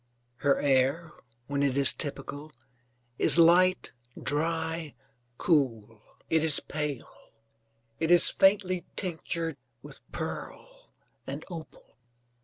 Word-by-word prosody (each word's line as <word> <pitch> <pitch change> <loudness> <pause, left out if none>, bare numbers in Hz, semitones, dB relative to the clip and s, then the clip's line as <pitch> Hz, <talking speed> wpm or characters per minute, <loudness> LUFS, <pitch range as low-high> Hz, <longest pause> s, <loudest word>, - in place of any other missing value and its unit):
Her 140 +1 +2
air, 140 +4 +1 0.3
when 140 +1 -2
it 140 -1 +1
is 140 - +6
typical, 145 0 -5 0.7
is 155 0 +5
light, 180 +2 +4 0.3
dry, 160 0 -1 0.4
cool. 115 - 0 0.3
It 160 -1 +2
is 155 -3 +1
pale, 150 -4 -5 0.9
it 160 - -1
is 175 -1 +5
faintly 190 -3 +2
tinctured 165 -2 -4 0.3
with - - -13
pearl - - -8 0.3
and - - -6
opal. 160 -6 -11
160 Hz, 100 wpm, -28 LUFS, 140-170 Hz, 0.9 s, is